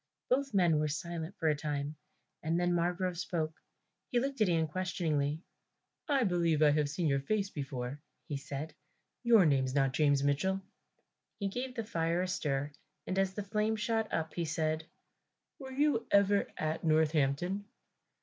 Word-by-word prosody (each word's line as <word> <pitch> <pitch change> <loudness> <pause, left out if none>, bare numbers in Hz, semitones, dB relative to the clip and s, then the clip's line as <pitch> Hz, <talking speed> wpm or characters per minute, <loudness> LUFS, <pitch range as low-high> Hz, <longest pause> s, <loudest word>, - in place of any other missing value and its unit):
Both 275 +2 +2
men 170 -5 +4
were 155 - +1
silent 165 +4 -4
for 160 - 0
a 150 - +4
time 145 0 -3 0.5
and 165 +2 0
then 175 0 +2
Margrove 175 +1 0
spoke. 160 -3 -3 0.5
He 245 - +2
looked 270 -1 -2
at 210 - +5
Ian 165 -2 +2
questioningly, 160 -3 -1 0.7
"I 275 -3 +3
believe 170 -5 +2
I 150 - +6
have 150 -1 +1
seen 165 +4 -2
your 140 -2 +3
face 200 +7 -1
before," 135 -1 -4 0.3
he 145 - -3
said; 145 +2 -5 0.5
"your 230 -6 +6
name's 135 -3 +2
not 135 -2 +2
James 145 -1 +3
Mitchell." 145 +7 +1 0.8
He 200 -2 -1
gave 250 +4 -4
the 230 - -2
fire 170 -4 0
a - - -1
stir, 145 -5 -1 0.3
and 190 +1 -1
as 190 -1 +1
the 205 - -3
flame 210 +2 0
shot 220 +1 -1
up 160 -1 -2
he 170 - -1
said, 155 0 -1 0.7
"Were 265 -2 -8
you 285 -3 +1
ever 200 0 +4
at 155 +1 -2
Northampton?" 160 +4 +2
165 Hz, 165 wpm, -32 LUFS, 150-200 Hz, 0.8 s, I